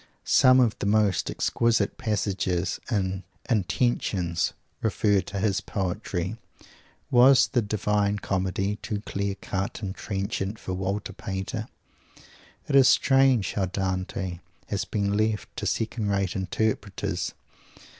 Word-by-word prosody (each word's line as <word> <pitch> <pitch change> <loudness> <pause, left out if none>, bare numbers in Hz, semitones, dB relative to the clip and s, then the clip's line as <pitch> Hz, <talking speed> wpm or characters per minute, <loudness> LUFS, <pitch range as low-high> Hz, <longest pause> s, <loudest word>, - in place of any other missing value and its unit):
Some 130 0 +6
of 120 -4 +3
the - - -1
most 105 -3 +2
exquisite 115 -3 +1
passages 95 -5 -1
in 95 -4 -1 0.2
"Intentions" 95 -5 0 0.3
refer 105 -2 +2
to 100 - -7
his 95 -1 +1
poetry. 95 +1 -3 0.7
Was 130 +2 +7
the 125 - +2
"Divine 105 -1 0
Comedy" 95 +1 -1
too 105 -1 -4
clear 100 -1 -3
cut 100 +3 -4
and 95 -1 -3
trenchant 100 +1 -3
for 95 - -5
Walter 95 +2 -3
Pater? 95 -1 -4 1.0
It 140 - 0
is 135 -2 +8
strange 135 -5 +4
how 100 - 0
Dante 95 -1 -3 0.3
has 100 -4 -1
been 100 +1 -1
left 110 -3 -1
to - - -2
second 110 -1 -1
rate 100 -2 0
interpreters! 100 +1 -2
100 Hz, 120 wpm, -26 LUFS, 95-110 Hz, 1.0 s, is